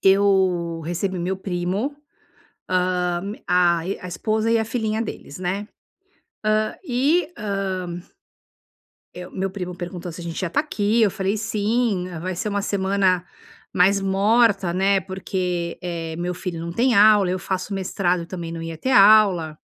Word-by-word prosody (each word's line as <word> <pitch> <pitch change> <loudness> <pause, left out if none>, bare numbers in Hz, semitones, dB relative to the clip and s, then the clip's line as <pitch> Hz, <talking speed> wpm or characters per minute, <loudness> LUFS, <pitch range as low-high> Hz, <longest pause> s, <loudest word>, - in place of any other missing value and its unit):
Eu 190 -4 +3
recebi 180 +3 -2
meu 180 +2 -2
primo, 190 +8 -2 0.8
hã, 180 -1 +1 0.3
a 175 -1 +3
me 190 +4 -2
a 180 - -7
esposa 215 +5 -1
e 230 - +4
a 220 - 0
filhinha 220 -1 -1
deles, 180 -8 -7
né. 185 +3 -2 0.8
Hã, 215 0 +1
e 295 +4 +1
hã 190 -4 -3 1.1
Eh, 180 0 -7
meu 190 +1 -3
primo 180 -2 -5
perguntou 175 0 -6
se 165 - -9
a - - -7
gente 170 -1 -4
ia 185 - 0
está 170 - 0
aqui, 225 -6 +1
eu 205 - +3
falei 195 +1 -1
sim 215 -2 0
vai 185 +2 -4
ser 210 +5 -2
uma 200 -1 -1
semana 190 -3 +1 0.5
mais 195 +3 +4
morta, 195 -1 +3
né, 195 +2 +3
porque, 180 -2 -3
eh, 165 -2 -4
meu 175 +1 -2
filho 180 -2 -5
não 170 +1 -5
tem 240 +7 +2
aula, 205 -2 +6
eu 185 - 0
faço 190 +2 -3
mestrado 180 -2 0
e - - -8
também 170 -1 -6
não 165 0 -6
ia 165 -1 -6
ter 260 - -2
aula. 195 -8 +5
190 Hz, 160 wpm, -22 LUFS, 175-210 Hz, 1.1 s, aula